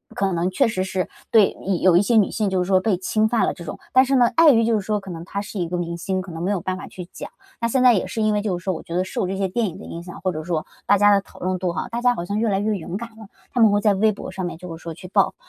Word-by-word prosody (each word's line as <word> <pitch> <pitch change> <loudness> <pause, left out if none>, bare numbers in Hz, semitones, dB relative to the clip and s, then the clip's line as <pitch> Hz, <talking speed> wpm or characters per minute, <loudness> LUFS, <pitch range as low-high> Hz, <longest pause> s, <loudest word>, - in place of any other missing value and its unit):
可 195 -5 0
能 175 +1 0
确 260 +7 +3
实 185 -4 -1
是 190 -1 -2 0.2
对， 215 -4 +5
嗯， 190 -2 0
有 185 -2 +5
一 175 - +6
些 225 +3 +2
女 210 - +3
性 215 -3 0
就 185 -1 +1
是 - - -6
说 190 -1 +4
被 200 -2 +1
侵 215 +4 +1
犯 235 -1 +2
了 - - 0
这 175 - -10
种， 155 - -7
但 260 - +7
是 270 +1 +1
呢， 245 -2 +5
碍 330 -1 +7
于 230 -3 +3
就 230 - +2
是 - - -4
说 210 +1 -1
可 195 -2 -9
能 165 -1 -7
他 200 +3 -5
是 205 0 -7
一 175 - -1
个 180 - -2
明 170 -1 -3
星， 185 +2 -2
可 185 -1 -9
能 165 0 -6
没 185 - 0
有 200 - 0
办 185 +2 -2
法 - - -8
去 180 - -9
讲。 - - -7 0.3
那 230 - +2
现 255 +2 +1
在 250 -1 +7
也 195 - 0
是 225 - -3
因 215 0 +2
为 210 - +1
就 200 -4 -1
是 175 - -11
说 190 - 0
我 160 - -6
觉 170 - -7
得 180 - +2
受 190 - -2
这 190 - -3
些 195 0 0
电 220 +4 -1
影 180 -1 -7
的 205 - -10
影 170 - -7
响， 175 0 -10
或 185 - 0
者 155 -2 -5
说 160 -2 -2 0.2
大 205 - +5
家 205 +1 +5
的 200 - +3
讨 - - -18
论 185 0 -2
度 180 -1 -1
哈， - - -3
大 235 0 -3
家 245 0 +3
好 170 - -4
像 205 +3 -2
越 225 0 +1
来 195 -1 +1
越 210 +1 0
勇 175 0 -6
敢 235 +2 -7
了。 220 -1 -13 0.3
她 250 - 0
们 220 - +7
会 205 0 +2
在 210 -1 +4
微 215 +3 +3
博 200 - -8
上 190 -1 -4
面 175 - -5
就 175 -1 -8
是 165 - -14
说 165 - -6
去 180 - -10
爆， - - +2
195 Hz, 385 characters per minute, -22 LUFS, 180-215 Hz, 0.3 s, 但